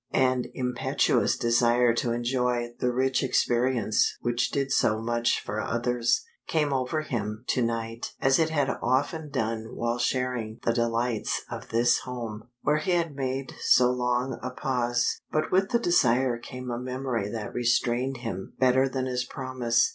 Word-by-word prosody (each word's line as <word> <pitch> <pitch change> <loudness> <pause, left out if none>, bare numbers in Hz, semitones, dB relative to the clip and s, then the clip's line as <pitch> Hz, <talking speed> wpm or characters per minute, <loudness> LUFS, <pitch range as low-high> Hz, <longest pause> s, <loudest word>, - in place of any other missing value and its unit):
An 130 -1 +2
impetuous 125 -1 +1
desire 120 0 +3
to 120 0 -1
enjoy 120 0 0
the 125 - +1
rich 130 +1 +1
experience 120 -4 +1
which 120 0 0
did 140 -1 -1
so 110 -4 +2
much 120 +1 +1
for 110 +1 -4
others, 120 - 0 0.2
came 150 -3 +1
over 135 +4 0
him 110 -6 -4
to 125 - +2
night 115 0 -3
as 135 +1 +3
it 160 -1 +3
had 145 -4 +1
often 145 +5 0
done 110 -3 -3
while 120 +1 -1
sharing 120 -3 -1
the 115 - +2
delights 115 -1 0
of - - -7
this 120 +1 +3
home, 115 -4 -6 0.2
where 150 +1 +2
he 180 +4 0
had 165 -4 0
made 135 0 -3
so 125 -1 +5
long 125 +1 -1
a - - -3
pause. 125 -1 0
But 155 - 0
with 195 +2 +3
the 240 - +3
desire 130 - +2
came 125 0 -7
a 120 - -3
memory 125 -4 -3
that 110 -1 -5
restrained 120 +2 +1
him 95 -4 -5
better 130 +1 +3
than 130 -1 -2
his 125 -1 -1
promise. 130 -3 0
125 Hz, 160 wpm, -27 LUFS, 120-130 Hz, 0.2 s, so